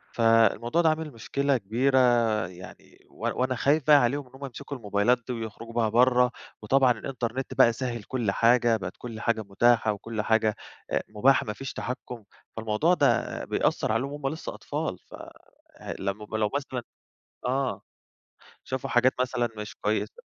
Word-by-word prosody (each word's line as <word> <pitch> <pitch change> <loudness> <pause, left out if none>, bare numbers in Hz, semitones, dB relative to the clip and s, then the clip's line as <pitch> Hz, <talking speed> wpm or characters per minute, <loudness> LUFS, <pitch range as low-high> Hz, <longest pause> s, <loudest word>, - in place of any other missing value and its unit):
فالموضوع 115 +5 +3
ده 160 - +4
عامل 155 -1 -2
مشكلة 140 +4 0
كبيرة 125 +6 +1 0.5
يعني، 90 0 -14
و - - -24 0.3
وأنا 130 0 +1
خايِف 145 +2 +1
بقى 150 - +8
عليهم 135 +1 +1
إن - - -22
هُم 140 +1 -7
يمسِكوا 140 +2 -7
الموبايلات 105 +2 +2
دي 125 - -2
ويخرُجوا 115 0 -7
بيها 115 -2 +1
برّه، 125 +2 +4 0.3
وطبعًا 130 +3 +4
الإنترنت 125 +2 -4
بقى 125 -3 +5
سهَّل 120 -3 -4
كل 120 -5 -1
حاجة، 115 +1 +3
بقِت 90 -2 -6
كل 115 -3 -8
حاجة 115 -2 0
متاحة 110 +2 +2
وكل 110 +1 -4
حاجة، 110 -1 +2 0.4
أ - - +2
مباحة، 130 +6 +3
ما 105 - -3
فيش 135 +4 -7
تحكُّم، 125 -3 -6 0.3
فالموضوع 110 +11 +1
ده - - +1
بيأثِّر - - 0
عليهُم 130 +5 -1
وهُم 145 -2 -4
لسَّه 160 - -6
أطفال. - - -4
ف - - -14 0.8
لمّا 105 +3 -4
لو 105 -1 +1
مثلًا 130 -3 -3 0.7
آه، 130 0 -1 0.8
شافوا 130 0 -4
حاجات 125 +2 +4
مثلًا 120 -2 0
مش 105 0 -7
كويِّسة. 110 - -2
120 Hz, 155 wpm, -27 LUFS, 110-130 Hz, 0.8 s, بقى